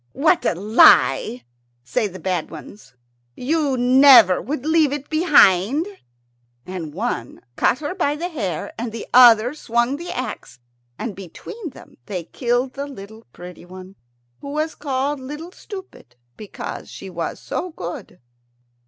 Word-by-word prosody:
"What 320 Hz, +5 st, +2 dB
a -, -, +1 dB
lie!" 135 Hz, -, +4 dB, 0.4 s
say 125 Hz, -, -1 dB
the 185 Hz, -1 st, -10 dB
bad 185 Hz, -4 st, -2 dB
ones. 205 Hz, -, -12 dB, 0.4 s
"You 285 Hz, 0 st, 0 dB
never 250 Hz, -6 st, +6 dB
would 270 Hz, -, -5 dB
leave 315 Hz, -2 st, +3 dB
it 290 Hz, +1 st, -6 dB
behind." 295 Hz, -, +4 dB, 0.8 s
And 180 Hz, -5 st, -6 dB
one 185 Hz, -, -4 dB, 0.2 s
caught -, -, +2 dB
her 300 Hz, +4 st, -3 dB
by 295 Hz, -6 st, 0 dB
the 345 Hz, +4 st, -4 dB
hair, 200 Hz, -, -4 dB
and 235 Hz, 0 st, -4 dB
the 230 Hz, -, -7 dB
other 240 Hz, 0 st, +7 dB
swung 240 Hz, -2 st, -1 dB
the 345 Hz, +3 st, -8 dB
axe, 255 Hz, -, -6 dB, 0.4 s
and 220 Hz, -5 st, -5 dB
between 320 Hz, -, -9 dB
them 265 Hz, -, -16 dB
they 180 Hz, -4 st, -4 dB
killed 245 Hz, -, -1 dB
the 280 Hz, +1 st, -5 dB
little 220 Hz, -3 st, -12 dB
pretty 180 Hz, 0 st, -11 dB
one, 185 Hz, +2 st, -12 dB, 0.4 s
who 280 Hz, -, -9 dB
was 310 Hz, +2 st, -2 dB
called 280 Hz, 0 st, -2 dB
Little 295 Hz, +6 st, -8 dB
Stupid 380 Hz, -, -11 dB, 0.2 s
because 210 Hz, -, -8 dB
she -, -, -10 dB
was -, -, -4 dB
so 365 Hz, -, -4 dB
good. 180 Hz, -, -8 dB
250 Hz, 145 wpm, -21 LUFS, 190-295 Hz, 0.8 s, other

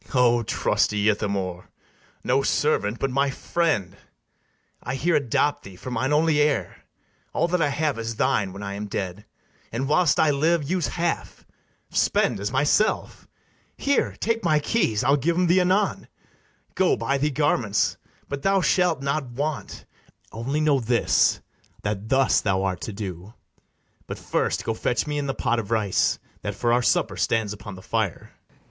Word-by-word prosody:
BARABAS. -, -, -10 dB
O 120 Hz, -1 st, +4 dB
trusty 105 Hz, -1 st, +1 dB
Ithamore! 100 Hz, -4 st, -2 dB, 0.5 s
no 130 Hz, +2 st, +2 dB
servant, 120 Hz, -6 st, +1 dB
but 135 Hz, +1 st, -1 dB
my 140 Hz, +2 st, +2 dB
friend! 140 Hz, -, -1 dB, 0.9 s
I 125 Hz, +3 st, -4 dB
here 165 Hz, +5 st, +1 dB
adopt 145 Hz, +1 st, +1 dB
thee 95 Hz, -1 st, -12 dB
for 125 Hz, +8 st, -8 dB
mine 130 Hz, +3 st, -1 dB
only 150 Hz, 0 st, +3 dB
heir: 140 Hz, -, -1 dB, 0.5 s
All -, -, +1 dB
that 180 Hz, 0 st, +1 dB
I 150 Hz, -, +3 dB
have 145 Hz, -3 st, -1 dB
is 115 Hz, 0 st, -4 dB
thine 100 Hz, -2 st, +1 dB
when 100 Hz, +2 st, -8 dB
I 100 Hz, 0 st, -4 dB
am 105 Hz, +1 st, -5 dB
dead; 100 Hz, +1 st, -4 dB, 0.5 s
And, 130 Hz, +4 st, -2 dB
whilst 155 Hz, +1 st, +3 dB
I 155 Hz, -, +4 dB
live, 155 Hz, +1 st, +1 dB
use 180 Hz, -1 st, 0 dB
half; 170 Hz, -1 st, -3 dB, 0.5 s
spend -, -, +1 dB
as 100 Hz, +2 st, -3 dB
myself; 145 Hz, -, +1 dB, 0.5 s
Here, 280 Hz, -1 st, +1 dB
take 230 Hz, -1 st, -1 dB
my 155 Hz, -3 st, +3 dB
keys, 145 Hz, -, 0 dB
I'll 140 Hz, +2 st, +4 dB
give 165 Hz, +5 st, 0 dB
'em 180 Hz, -, +3 dB
thee 180 Hz, +2 st, +4 dB
anon; 190 Hz, +3 st, +1 dB, 0.7 s
Go 190 Hz, -, +2 dB
buy 140 Hz, 0 st, -1 dB
thee 150 Hz, +2 st, +1 dB
garments; 130 Hz, -8 st, +1 dB, 0.3 s
but 140 Hz, -1 st, -5 dB
thou 195 Hz, +3 st, +3 dB
shalt 180 Hz, -5 st, +2 dB
not 140 Hz, 0 st, -1 dB
want: 140 Hz, +4 st, -4 dB, 0.5 s
Only 135 Hz, +7 st, -2 dB
know 150 Hz, -3 st, +3 dB
this, 120 Hz, 0 st, +2 dB, 0.4 s
that 105 Hz, +1 st, -3 dB
thus 135 Hz, -1 st, +3 dB
thou 95 Hz, -2 st, 0 dB
art 95 Hz, -2 st, -2 dB
to -, -, -4 dB
do 100 Hz, 0 st, -7 dB, 0.7 s
But -, -, -5 dB
first -, -, -1 dB
go 115 Hz, -, 0 dB
fetch 120 Hz, +2 st, -1 dB
me 150 Hz, -1 st, -2 dB
in 140 Hz, -, -3 dB
the 135 Hz, -, -2 dB
pot 120 Hz, -, 0 dB
of 110 Hz, -3 st, -5 dB
rice 110 Hz, -4 st, +1 dB, 0.2 s
That 105 Hz, -1 st, -4 dB
for 120 Hz, +3 st, +1 dB
our 125 Hz, -, +3 dB
supper -, -, +1 dB
stands 110 Hz, -2 st, 0 dB
upon 100 Hz, -1 st, -9 dB
the 95 Hz, -, -12 dB
fire. 110 Hz, -6 st, -2 dB
ITHAMORE. -, -, -35 dB
130 Hz, 170 wpm, -24 LUFS, 105-150 Hz, 0.9 s, O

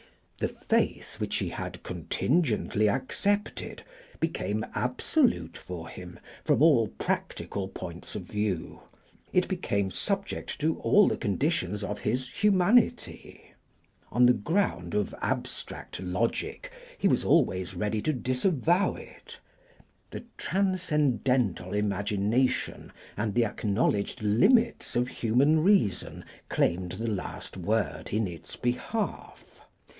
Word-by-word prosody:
The -, -, +1 dB
faith -, -, -1 dB
which -, -, -2 dB
he -, -, -1 dB
had -, -, -6 dB
contingently 115 Hz, -8 st, +1 dB
accepted 200 Hz, -, -1 dB, 0.4 s
became -, -, -1 dB
absolute 230 Hz, -, +1 dB
for 85 Hz, -2 st, -7 dB
him 90 Hz, -1 st, -10 dB, 0.2 s
from -, -, +3 dB
all 135 Hz, -9 st, +6 dB
practical 100 Hz, -1 st, -3 dB
points 90 Hz, 0 st, -7 dB
of 105 Hz, -, -4 dB
view; 105 Hz, -2 st, -2 dB, 0.5 s
it -, -, +3 dB
became 100 Hz, -1 st, -1 dB
subject 195 Hz, -, -3 dB
to 160 Hz, +2 st, +1 dB
all 210 Hz, 0 st, +5 dB
the -, -, 0 dB
conditions 105 Hz, -, -1 dB
of 105 Hz, +1 st, -3 dB
his 130 Hz, +4 st, -1 dB
humanity. 205 Hz, +3 st, +1 dB, 0.6 s
On 125 Hz, 0 st, +5 dB
the 125 Hz, -, +7 dB
ground 105 Hz, -, -1 dB
of 105 Hz, -1 st, 0 dB
abstract -, -, -4 dB
logic 115 Hz, -, -2 dB, 0.3 s
he -, -, +2 dB
was -, -, +2 dB
always 95 Hz, -, +2 dB
ready 105 Hz, +3 st, -1 dB
to 155 Hz, -, +1 dB
disavow 150 Hz, +7 st, +1 dB
it; -, -, -12 dB, 0.7 s
the -, -, -7 dB
transcendental 145 Hz, -, +1 dB
imagination 105 Hz, +4 st, 0 dB, 0.2 s
and 105 Hz, -1 st, -2 dB
the 120 Hz, -, +4 dB
acknowledged 105 Hz, +1 st, 0 dB
limits 210 Hz, -, +3 dB
of 120 Hz, +1 st, +2 dB
human 135 Hz, +7 st, +2 dB
reason 180 Hz, -, +2 dB, 0.2 s
claimed 90 Hz, +1 st, 0 dB
the 110 Hz, +5 st, -4 dB
last 105 Hz, -4 st, -4 dB
word 105 Hz, +4 st, -1 dB
in 110 Hz, +1 st, +1 dB
its 85 Hz, -4 st, -7 dB
behalf. 160 Hz, -, -3 dB
115 Hz, 115 wpm, -28 LUFS, 100-160 Hz, 0.7 s, the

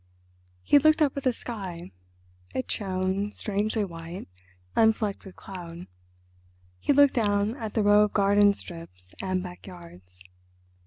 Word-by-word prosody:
He 290 Hz, -, +6 dB
looked 310 Hz, +2 st, +4 dB
up 280 Hz, -, +1 dB
at 280 Hz, -, -3 dB
the 255 Hz, -, +2 dB
sky: 190 Hz, -8 st, -7 dB, 0.6 s
it 260 Hz, -, -2 dB
shone, 190 Hz, +1 st, -1 dB
strangely 210 Hz, +1 st, -1 dB
white, 170 Hz, +1 st, -8 dB, 0.5 s
unflecked 220 Hz, -3 st, +2 dB
with 190 Hz, -, -11 dB
cloud; 175 Hz, -2 st, -9 dB, 0.9 s
he -, -, +1 dB
looked 285 Hz, -1 st, +6 dB
down 205 Hz, -1 st, +1 dB
at 220 Hz, -4 st, -6 dB
the 220 Hz, -, +2 dB
row 205 Hz, 0 st, +6 dB
of 210 Hz, -, -5 dB
garden 205 Hz, 0 st, +4 dB
strips 90 Hz, -, -10 dB
and 185 Hz, -1 st, -1 dB
backyards. 170 Hz, -, -12 dB
200 Hz, 130 wpm, -27 LUFS, 175-215 Hz, 0.9 s, He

